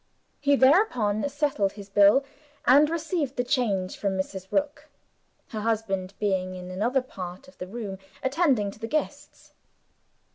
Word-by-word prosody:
He 285 0 +3
thereupon 260 - +3
settled 275 -9 0
his 205 -2 -10
bill, 205 +7 +5 0.4
and 285 +4 +6
received 325 -4 -2
the 245 - 0
change 225 -8 0
from 195 -2 -1
Mrs. 190 0 -4
Rook 295 +1 -1 0.6
her 220 - -5
husband 200 -4 -2
being 185 -3 -1
in 180 0 -8
another 240 +8 0
part 185 -1 -8
of 275 - -17
the 180 - -5
room, 200 -2 -6 0.2
attending 265 - +2
to 205 - -16
the 225 - -4
guests. 295 +1 -4
225 Hz, 145 wpm, -26 LUFS, 195-280 Hz, 0.6 s, and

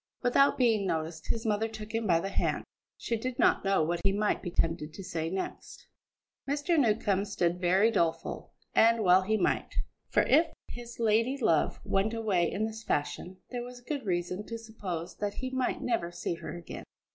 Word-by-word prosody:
Without 265 +3 +4
being 225 -6 +3
noticed, 160 -1 -3
his 230 +1 -2
mother 215 0 +1
took 220 -1 -8
him 225 -1 -1
by 170 -3 +4
the 195 - -3
hand; - - 0 0.3
she 235 - -2
did 245 +2 -4
not - - +3
know 195 -4 +3
what 170 +2 -1
he 195 - +3
might 210 +1 0
be 180 - -4
tempted 165 -2 -1
to 195 - -7
say 165 -3 -3
next. 190 +2 -5 0.6
Mr. 295 +4 +2
Newcombe 210 -5 +2
stood 180 -3 -1
very 190 +5 +4
doleful. 170 -6 -1 0.2
And 230 0 +5
well 185 0 +6
he 215 +3 +1
might; - - 0 0.3
for - - +3
if 315 +5 +5 0.2
his 240 -1 -9
lady 230 +4 +2
love 165 - +2
went 205 +4 +1
away 200 -7 +1
in 215 +2 -1
this 220 0 -6
fashion, 180 +1 -2
there 245 -1 -3
was 245 0 -8
good 275 +2 -4
reason 180 0 -2
to 230 - -4
suppose 200 -7 -6
that 205 -1 -2
he 260 0 -4
might 260 -1 -1
never 225 -8 0
see 175 - -3
her 170 - -7
again. 170 - -8
210 Hz, 190 wpm, -30 LUFS, 175-230 Hz, 0.6 s, well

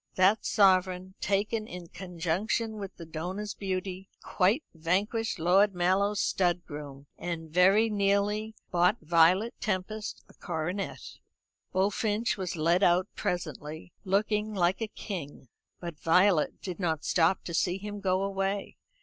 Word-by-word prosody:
That 190 +4 +3
sovereign, 185 -2 +3
taken 210 +2 0
in 175 -4 -9
conjunction 190 +6 -2
with 195 -2 -7
the 170 - -9
donor's 180 +6 -4
beauty, 190 0 -4
quite 205 +11 +2
vanquished 195 +7 0
Lord 190 +4 +4
Mallow's 195 +4 +2
stud 175 -2 +1
groom, 145 -2 -8
and 165 -2 -5
very 190 +6 +5
nearly 205 +1 0 0.2
bought 175 0 +3
Violet 175 +7 +4
Tempest 210 +2 -3
a - - -19
coronet. 180 +3 -4 0.5
Bullfinch 205 +4 +1
was 185 -3 -4
led 170 +3 +2
out 180 +1 +3
presently, 160 -1 -4
looking 210 +2 0
like 180 +2 +1
a 225 - -1
king; 160 - -7 0.3
but 170 -4 -7
Violet 180 -1 +3
did 180 -1 -5
not 160 -4 -1
stop 175 +2 +2
to 170 - -6
see 180 +2 +1
him 205 +1 -6
go 190 -1 +1
away. 195 0 -2
185 Hz, 130 wpm, -29 LUFS, 175-205 Hz, 0.5 s, very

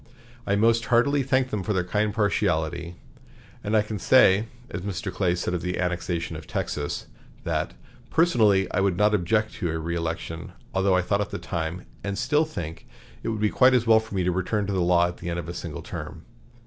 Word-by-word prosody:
I 100 - +2
most 115 +2 +3
heartily 140 +4 +3
thank 130 -1 +1
them 105 - -1
for 105 +3 -1
their 90 -2 +1
kind 105 +4 0
partiality; 85 -5 0 0.7
and 110 +2 +2
I 105 - +4
can 105 -1 -5
say, 105 -2 +5 0.2
as - - -4
Mr. 100 +1 -4
Clay 90 -3 +1
said 90 - -2
of 90 - -1
the 90 0 -2
annexation 85 -2 -2
of 80 - -9
Texas, 75 -1 -3 0.4
that - - -2 0.3
'personally 110 - +3
I - - 0
would 95 -3 +1
not 105 +2 +3
object' 105 +3 +1
to 85 - -1
a - - -2
reëlection, 85 0 -4 0.2
although 95 0 +3
I 90 - +2
thought 100 +2 +1
at 105 - -2
the - - -4
time, 85 0 -4 0.2
and 100 -1 -3
still 150 +6 +2
think, 85 - -7 0.3
it - - -3
would 110 -1 -2
be 105 - +2
quite 130 0 +5
as 120 -2 +2
well 110 -1 +6
for 110 -2 -8
me 95 - +1
to 90 - +1
return 95 +4 -1
to 100 - -2
the 95 - +1
law 85 0 +4
at 90 - -7
the 85 - -6
end 85 - -2
of 85 - -4
a 85 - -5
single 85 -4 -6
term. - - -7
95 Hz, 215 wpm, -25 LUFS, 85-110 Hz, 0.7 s, well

